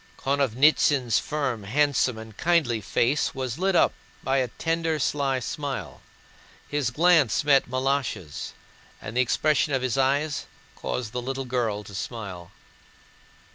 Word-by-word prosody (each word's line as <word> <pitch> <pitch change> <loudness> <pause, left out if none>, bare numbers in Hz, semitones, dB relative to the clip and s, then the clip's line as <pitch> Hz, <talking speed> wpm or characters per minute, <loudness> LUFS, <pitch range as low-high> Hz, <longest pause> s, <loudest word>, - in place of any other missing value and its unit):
Konovnítsyn's 135 -2 +3
firm, 140 -7 -2
handsome, 130 +2 +1
and 110 -1 -10
kindly 150 -7 +1
face 120 +9 0
was 130 +1 -4
lit 190 0 +1
up - - +4 0.3
by 135 +1 +1
a 130 -2 +1
tender, 165 +8 -1
sly 135 -2 0
smile. 140 +2 -5 0.7
His 145 -4 -1
glance 155 - +3
met 140 -4 +4
Malásha's, 130 - -2 0.5
and 110 - -8
the 125 - +4
expression 145 +4 +1
of 130 - -1
his 130 +1 0
eyes 140 +3 +1 0.3
caused 115 -4 -4
the 125 0 -3
little 135 +2 -4
girl 115 -5 -1
to 100 - -12
smile. 100 -4 -6
130 Hz, 135 wpm, -25 LUFS, 115-145 Hz, 0.7 s, up